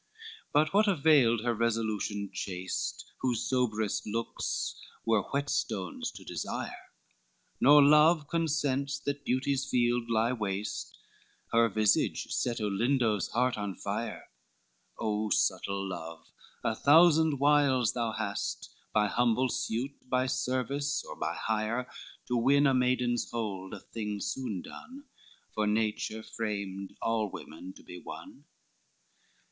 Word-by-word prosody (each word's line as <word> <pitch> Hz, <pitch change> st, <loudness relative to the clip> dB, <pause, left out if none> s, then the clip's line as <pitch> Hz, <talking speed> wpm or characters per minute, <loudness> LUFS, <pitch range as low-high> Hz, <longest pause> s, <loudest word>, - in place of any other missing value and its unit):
XV 450 Hz, 0 st, -15 dB
But 155 Hz, +3 st, +3 dB
what 210 Hz, +2 st, +4 dB
availed 140 Hz, -, +4 dB
her 120 Hz, -1 st, +1 dB
resolution 110 Hz, -3 st, -1 dB
chaste, 90 Hz, -1 st, -4 dB
Whose 125 Hz, -3 st, -1 dB
soberest 110 Hz, -5 st, 0 dB
looks 115 Hz, +2 st, -2 dB, 0.3 s
were 110 Hz, -2 st, +3 dB
whetstones 115 Hz, -9 st, -2 dB
to -, -, -10 dB
desire? -, -, -5 dB, 0.7 s
Nor 145 Hz, +2 st, +8 dB
love 150 Hz, +1 st, +5 dB
consents 145 Hz, -4 st, 0 dB
that 140 Hz, 0 st, -4 dB
beauty's 135 Hz, +1 st, 0 dB
field 120 Hz, -2 st, +1 dB
lie 115 Hz, +2 st, +2 dB
waste, 105 Hz, -2 st, -4 dB, 0.5 s
Her 115 Hz, 0 st, +4 dB
visage 105 Hz, 0 st, +1 dB
set 120 Hz, -1 st, -1 dB
Olindo's 110 Hz, 0 st, +1 dB
heart 125 Hz, -1 st, 0 dB
on 100 Hz, -2 st, -3 dB
fire, -, -, -5 dB, 0.7 s
O 110 Hz, 0 st, -1 dB
subtle 100 Hz, 0 st, 0 dB
love, 80 Hz, -2 st, -7 dB, 0.4 s
a -, -, +1 dB
thousand 160 Hz, 0 st, +5 dB
wiles 140 Hz, -4 st, +3 dB
thou 115 Hz, -2 st, -1 dB
hast, -, -, -4 dB, 0.2 s
By 105 Hz, -1 st, +3 dB
humble 120 Hz, +4 st, +2 dB
suit, 125 Hz, +4 st, -3 dB
by 130 Hz, 0 st, +2 dB
service, 135 Hz, +3 st, -1 dB
or -, -, -7 dB
by -, -, -3 dB
hire, 110 Hz, +3 st, -1 dB, 0.4 s
To 125 Hz, -, 0 dB
win 140 Hz, +5 st, +4 dB
a 135 Hz, -, +4 dB
maiden's 125 Hz, -1 st, +1 dB
hold, 100 Hz, -5 st, -4 dB
a -, -, -9 dB
thing 105 Hz, -2 st, -5 dB
soon 105 Hz, -4 st, -3 dB
done, 275 Hz, +3 st, -11 dB, 0.5 s
For 105 Hz, -1 st, 0 dB
nature 110 Hz, 0 st, -1 dB
framed 100 Hz, -4 st, -5 dB
all 115 Hz, -2 st, +1 dB
women 90 Hz, +2 st, -9 dB
to -, -, -16 dB
be 90 Hz, -, -10 dB
won. -, -, -10 dB
120 Hz, 125 wpm, -30 LUFS, 105-140 Hz, 0.7 s, Nor